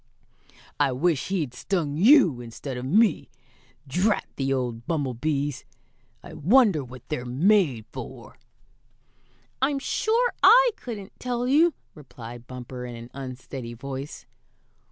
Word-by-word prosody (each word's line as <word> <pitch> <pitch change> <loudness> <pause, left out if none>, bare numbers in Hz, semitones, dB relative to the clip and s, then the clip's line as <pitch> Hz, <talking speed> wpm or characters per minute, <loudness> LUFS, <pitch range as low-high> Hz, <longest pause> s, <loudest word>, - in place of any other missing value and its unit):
"I 135 - +2
wish 155 +2 0
he'd 165 -10 -2
stung 155 -1 -2
you 185 - +5
instead 120 +3 -7
of 125 +1 -5
me. 210 - +2 0.6
Drat 185 +10 +1
the 135 0 -1
old 120 -3 -2
bumblebees! 145 -1 -1 0.6
I - - -11
wonder 200 - +4
what 130 0 -12
they're 150 -6 -2
made 140 - +2
for!" 125 -3 -9 1.2
"I'm 275 +1 +2
sure 455 - +1
I - - +7
couldn't 210 - -9
tell 245 0 -2
you," 315 +5 +4 0.2
replied 120 -5 -11
Bumper, 125 0 -8
in 120 -1 -7
an 115 +1 -10
unsteady 130 -2 -7
voice. 135 +3 -7
140 Hz, 120 wpm, -25 LUFS, 125-200 Hz, 1.2 s, I